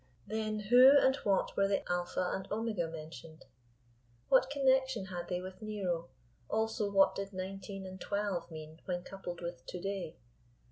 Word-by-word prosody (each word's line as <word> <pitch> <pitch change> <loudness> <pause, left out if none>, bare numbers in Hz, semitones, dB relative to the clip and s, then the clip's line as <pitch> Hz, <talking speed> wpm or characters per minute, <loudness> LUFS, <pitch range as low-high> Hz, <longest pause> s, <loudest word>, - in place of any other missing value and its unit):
Then 215 0 -2
who 250 +6 +8
and 265 -1 +4
what 200 -6 +1
were 195 - +3
the 195 - 0
Alpha 180 0 -1
and 190 0 -5
Omega 210 -5 -1
mentioned? 160 0 -9 0.8
What 260 -1 +5
connection 265 -5 +2
had 180 -2 -5
they 180 -1 -2
with 185 +1 -9
Nero; 185 -6 -2 0.4
also 220 -1 0
what 195 -1 +5
did 195 0 -5
nineteen 195 +1 -6
and 190 0 -9
twelve 200 -4 -2
mean 155 0 -9
when 175 -1 -2
coupled 180 -3 -7
with 170 0 -6
To 180 - -5
day? 195 -3 -4
195 Hz, 155 wpm, -33 LUFS, 175-215 Hz, 0.8 s, who